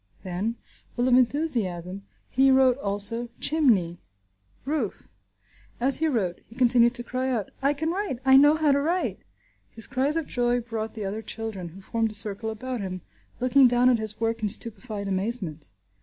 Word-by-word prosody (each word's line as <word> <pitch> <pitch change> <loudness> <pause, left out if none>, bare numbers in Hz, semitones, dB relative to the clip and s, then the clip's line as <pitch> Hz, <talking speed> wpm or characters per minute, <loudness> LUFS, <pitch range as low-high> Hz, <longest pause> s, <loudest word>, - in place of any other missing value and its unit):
Then, 190 +5 -3 0.4
full 245 +1 +1
of 255 - +3
enthusiasm, 215 - 0 0.2
he 270 +2 +3
wrote 265 -1 +4
also 205 +3 -1
"chimney," 215 - +1 0.7
"roof." 275 -8 -3 0.7
As 260 +2 +3
he 320 - +1
wrote, 200 - -1
he 225 - -16
continued 245 -1 +4
to 240 - 0
cry 255 +2 -2
out, 225 -7 -2
"I 280 +2 +2
can 320 +3 -1
write! 380 -7 -2
I 265 0 +6
know 290 +3 +7
how 310 -2 +2
to 280 0 +2
write!" 345 +5 -1 0.5
His 225 - -3
cries 275 +5 0
of 325 - -1
joy 245 0 0
brought 225 -2 -5
the 215 -2 -4
other 205 +3 -4
children, 220 -6 -5
who 185 +4 -13
formed 225 +3 -1
a 215 - -2
circle 210 +1 -1
about 245 +2 -5
him, 185 -2 -5 0.4
looking 255 +1 +5
down 245 +1 +4
at 240 - +2
his 215 -1 -4
work 225 0 -1
in 210 - 0
stupefied 210 -1 0
amazement. 190 -6 -3
235 Hz, 175 wpm, -26 LUFS, 205-265 Hz, 0.7 s, know